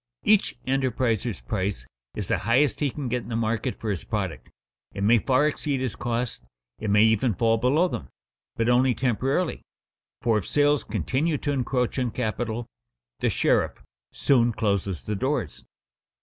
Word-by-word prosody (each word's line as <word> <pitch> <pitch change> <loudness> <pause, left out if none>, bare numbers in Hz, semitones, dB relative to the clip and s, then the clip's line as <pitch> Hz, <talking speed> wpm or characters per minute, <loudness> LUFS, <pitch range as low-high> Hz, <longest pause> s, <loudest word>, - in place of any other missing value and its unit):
Each 210 - +3
enterpriser's 125 - 0
price 95 +2 -2 0.3
is - - -3
the - - +1
highest 130 +7 +2
he 145 - +1
can 140 0 -5
get 125 0 -1
in - - -11
the 115 - -2
market 115 +2 -1
for 110 - -3
his 95 - -3
product; - - -4 0.5
it 100 - -2
may 115 +3 +5
far 130 +5 +2
exceed 145 -2 -1
his 130 -4 -2
costs; 120 0 -3 0.4
it 110 - -3
may 105 +1 +5
even 110 0 +3
fall 115 +3 +2
below 145 +9 +3
them, - - -5 0.5
but 115 - 0
only 125 0 +4
temporarily, 135 +7 0 0.6
for 115 -2 +2
if 95 - -7
sales 145 -1 +3
continue 130 - -1
to 145 - -2
encroach 125 -1 0
on 125 -1 0
capital, 115 0 -3 0.5
the - - +1
sheriff - - +1 0.3
soon 120 -4 +3
closes 100 -5 -1
the 105 - -3
doors. 130 - -2
120 Hz, 165 wpm, -25 LUFS, 110-135 Hz, 0.6 s, may